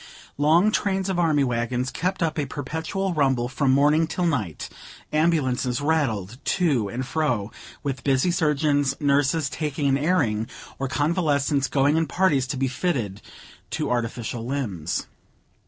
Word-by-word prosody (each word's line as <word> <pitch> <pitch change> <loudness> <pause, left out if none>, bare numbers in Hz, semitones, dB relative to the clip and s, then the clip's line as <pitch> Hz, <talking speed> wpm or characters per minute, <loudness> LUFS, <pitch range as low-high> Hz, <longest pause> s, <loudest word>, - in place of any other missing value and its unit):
Long 165 +8 +4
trains 195 -2 0
of 185 -2 0
army 155 -4 +3
wagons 125 +1 -1
kept 180 +1 -1
up 160 -1 -1
a 145 - -1
perpetual 160 +8 -3
rumble 135 -5 +1
from 135 +2 0
morning 150 +4 +4
till 180 +2 -1
night; 110 - -2 0.5
ambulances 140 -6 +1
rattled 130 -8 -1
to 140 - +1
and 125 +5 -4
fro 125 -9 -1 0.3
with 135 -3 -3
busy 135 +5 +2
surgeons, 150 -4 +1
nurses 145 +1 +2
taking 145 -1 -2
an 135 0 +2
airing, 135 -10 +1 0.3
or 135 - -1
convalescents 145 -1 +1
going 145 +2 +2
in 165 -1 +1
parties 145 -5 +2
to 135 - -3
be 135 +1 +1
fitted 125 - -2 0.5
to - - -2
artificial 120 -1 -2
limbs. 115 - -3
140 Hz, 140 wpm, -24 LUFS, 125-160 Hz, 0.5 s, Long